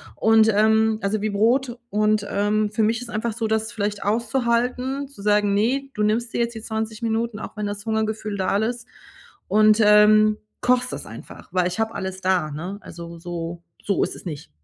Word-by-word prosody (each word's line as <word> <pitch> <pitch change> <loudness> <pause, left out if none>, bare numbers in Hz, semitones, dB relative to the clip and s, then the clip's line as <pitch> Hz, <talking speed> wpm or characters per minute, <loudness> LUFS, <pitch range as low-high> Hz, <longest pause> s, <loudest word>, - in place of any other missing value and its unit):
Und, 220 0 +4
ähm 220 +1 +3
also 200 +1 -1
wie 215 - 0
Brot, 240 +5 +1
und, 210 0 +1
ähm, 210 +1 +1
für 220 +1 0
mich 225 +2 +1
ist 245 - -7
einfach 220 +1 -2
so, 225 0 -2
das 220 +1 -1
vielleicht 205 -2 -3
auszuhalten 245 +4 0
zu 275 -6 -14
sagen: 205 0 +2
„Ne, 255 +7 0
du 210 - -1
nimmst 225 +3 0
dir - - -1
jetzt 235 0 -1
die 225 - -6
20 220 -1 -4
Minuten, 225 -1 -1
auch - - -8
wenn 210 - -2
das 205 +1 -6
Hungergefühl 220 -1 -2
da 190 +1 +1
ist 235 +3 -2 0.6
und, 215 +2 +4
ähm, 210 0 +6 0.2
kochst 250 0 +2
das - - -6
einfach“, - - -11
weil 180 -1 +2
ich 180 +4 -5
habe 225 0 0
alles 190 -2 -5
da, 185 -4 +1
ne, 175 +7 -5
also 170 0 -10
so 170 0 -6 0.2
so 200 - +1
ist - - -1
es - - -12
nicht. 150 -4 -7
215 Hz, 195 wpm, -23 LUFS, 205-230 Hz, 0.6 s, ähm